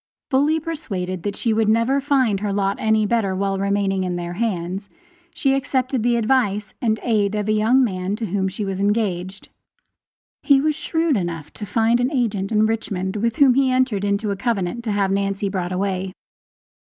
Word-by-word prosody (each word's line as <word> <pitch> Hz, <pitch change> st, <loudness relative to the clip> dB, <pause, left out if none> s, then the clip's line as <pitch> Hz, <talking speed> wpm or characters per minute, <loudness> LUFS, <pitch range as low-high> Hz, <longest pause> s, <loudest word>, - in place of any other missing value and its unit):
Fully 290 Hz, +4 st, +3 dB
persuaded 195 Hz, -, -4 dB
that 200 Hz, +3 st, -3 dB
she 230 Hz, -, 0 dB
would 220 Hz, -1 st, +2 dB
never 230 Hz, +5 st, +2 dB
find 260 Hz, -8 st, +2 dB
her 205 Hz, 0 st, -2 dB
lot 195 Hz, 0 st, 0 dB
any 220 Hz, -1 st, +2 dB
better 205 Hz, -3 st, 0 dB
while 195 Hz, 0 st, -1 dB
remaining 200 Hz, -1 st, 0 dB
in 180 Hz, -1 st, -2 dB
their 175 Hz, 0 st, -4 dB
hands, 195 Hz, -2 st, -3 dB, 0.5 s
she 280 Hz, -6 st, +2 dB
accepted 260 Hz, -2 st, 0 dB
the 240 Hz, +1 st, +2 dB
advice 215 Hz, -4 st, +1 dB
and 220 Hz, -2 st, +1 dB
aid 210 Hz, -3 st, +1 dB
of 210 Hz, 0 st, -2 dB
a -, -, +2 dB
young 225 Hz, +5 st, +3 dB
man 190 Hz, -3 st, -2 dB
to 225 Hz, +1 st, -4 dB
whom 190 Hz, 0 st, -1 dB
she 200 Hz, +2 st, -4 dB
was 195 Hz, 0 st, -3 dB
engaged; 200 Hz, -3 st, -1 dB, 0.9 s
he 280 Hz, -2 st, +5 dB
was 305 Hz, +2 st, +1 dB
shrewd 320 Hz, 0 st, 0 dB
enough 165 Hz, -5 st, -4 dB
to 210 Hz, -, -7 dB
find 230 Hz, +3 st, +2 dB
an 250 Hz, +3 st, +1 dB
agent 220 Hz, -8 st, -1 dB
in 215 Hz, 0 st, +3 dB
Richmond, 205 Hz, -3 st, -2 dB
with 230 Hz, +2 st, 0 dB
whom 280 Hz, -4 st, +5 dB
he 270 Hz, +1 st, +3 dB
entered 255 Hz, -6 st, +1 dB
into 200 Hz, +1 st, 0 dB
a -, -, -1 dB
covenant 215 Hz, 0 st, -2 dB
to 220 Hz, -, -1 dB
have 200 Hz, -1 st, +1 dB
Nancy 195 Hz, 0 st, -1 dB
brought 185 Hz, -2 st, -3 dB
away. 185 Hz, 0 st, -2 dB
210 Hz, 190 wpm, -21 LUFS, 195-240 Hz, 0.9 s, he